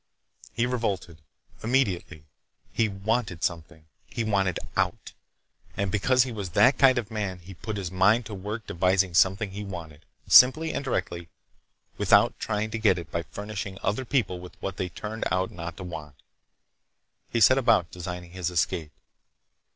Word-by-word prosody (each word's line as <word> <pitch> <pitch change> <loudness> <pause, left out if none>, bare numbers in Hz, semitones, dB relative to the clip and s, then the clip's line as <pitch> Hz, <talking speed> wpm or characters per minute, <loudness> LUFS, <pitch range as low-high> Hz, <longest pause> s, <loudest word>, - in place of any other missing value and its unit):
He 115 - 0
revolted, 100 -10 -3 0.4
immediately. 100 - 0 0.5
He 115 -2 +1
wanted 100 -3 -2
something! 80 -1 -4 0.2
He 115 - -3
wanted 100 -5 +1 0.2
out. - - -1 0.6
And 100 -1 -1
because 125 +5 +3
he 130 - -5
was 100 -5 -5
that 125 - +4
kind 130 -2 +6
of 115 -2 -3
man 100 -4 -3
he 90 +2 -12
put 110 +4 -6
his 95 -4 -4
mind 105 +6 +3
to 105 - -7
work 105 +3 -5
devising 95 0 +1
something 95 +4 +3
he 105 +2 -6
wanted, 85 -5 -8 0.2
simply 155 +6 +7
and - - -2
directly, 85 - -3 0.7
without - - +4
trying 110 0 -2
to 110 - -3
get 110 -3 +3
it 85 -3 -8
by 85 - -1
furnishing 100 +3 -6
other 105 +7 0
people 120 -8 0
with 90 0 -12
what 95 0 -5
they 90 - -2
turned 110 +5 -5
out 95 +2 0
not 85 0 -7
to - - -7
want. 75 -5 -8 1.1
He 115 - 0
set 130 +5 +6
about 115 -10 +3
designing 90 -1 -7
his 90 -1 -3
escape. 80 -3 -1
95 Hz, 160 wpm, -26 LUFS, 90-110 Hz, 1.1 s, simply